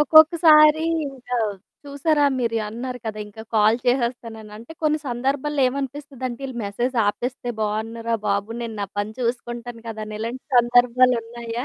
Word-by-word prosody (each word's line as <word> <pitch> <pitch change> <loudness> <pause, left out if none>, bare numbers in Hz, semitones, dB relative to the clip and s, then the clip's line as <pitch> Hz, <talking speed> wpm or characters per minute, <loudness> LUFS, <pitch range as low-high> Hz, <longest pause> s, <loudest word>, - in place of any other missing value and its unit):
ఒక్కొక్కసారి 315 0 +7 0.3
ఇంకా 255 -2 -7 0.5
చూసారా 290 +1 +1
మీరు 230 -2 0
అన్నారు 250 +3 -5
కదా! 215 -1 -4
ఇంకా 215 +2 -11
కాల్ 215 +1 +5
చేసేస్తానని. 235 -4 -1
అంటే 235 +8 -11
కొన్ని 305 0 +2
సందర్భాల్లో 270 +4 -1
ఏమనిపిస్తదంటే, 270 -2 -5
ఈళ్ళు 260 -2 -8
మెసేజ్ 240 +6 -2
ఆపేస్తే 245 +3 -2
బావున్నుర 220 +2 -3 0.2
బాబు! 200 +2 0
నేను 230 -2 -5
నా 200 - -1
పని 205 +1 -2
చూసుకుంటాను 240 -1 -4
కదాని 215 -1 -6
ఇలాంటి 235 +3 -5
సందర్భాలు 245 +1 +5
ఉన్నాయా? 235 +1 -6
240 Hz, 135 wpm, -23 LUFS, 225-270 Hz, 0.5 s, ఒక్కొక్కసారి